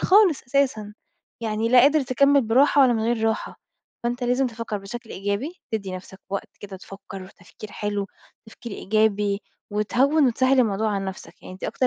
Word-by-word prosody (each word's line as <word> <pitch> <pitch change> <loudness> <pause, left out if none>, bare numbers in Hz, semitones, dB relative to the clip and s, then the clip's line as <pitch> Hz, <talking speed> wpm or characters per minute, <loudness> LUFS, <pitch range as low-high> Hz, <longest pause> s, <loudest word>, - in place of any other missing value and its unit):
خالص 380 -6 +4
أساسًا، 245 -6 0 0.5
يعني 220 0 -1
لا 250 +1 +7
قادر 290 +4 +5
تكمل 275 +3 +4
براحة 270 +5 +4
ولا 250 -2 +5
من 220 -1 -1
غير 230 -1 0
راحة، 220 - -4 0.4
فأنت 245 +1 -2
لازم 250 +2 +2
تفكر 230 -3 -5
بشكل 225 +4 -9
إيجابي، 205 - -3
تدّي 195 -4 -3
نفسك 190 +1 -12
وقت 200 - -4
كده 195 -2 -8
تفكر، 195 0 -10
وتفكير 185 +2 -13
حلو، 205 -1 -2 0.4
تفكير 225 +1 -10
إيجابي، 210 -1 +1 0.3
وتهوِّن 260 +8 +2
وتسهِّل 260 +2 +2
الموضوع 215 -1 +1
على 195 - -2
نفسك، 190 -1 -8
يعني 185 - -9
دي - - -5
أكتر 255 - 0
220 Hz, 165 wpm, -24 LUFS, 200-255 Hz, 0.5 s, لا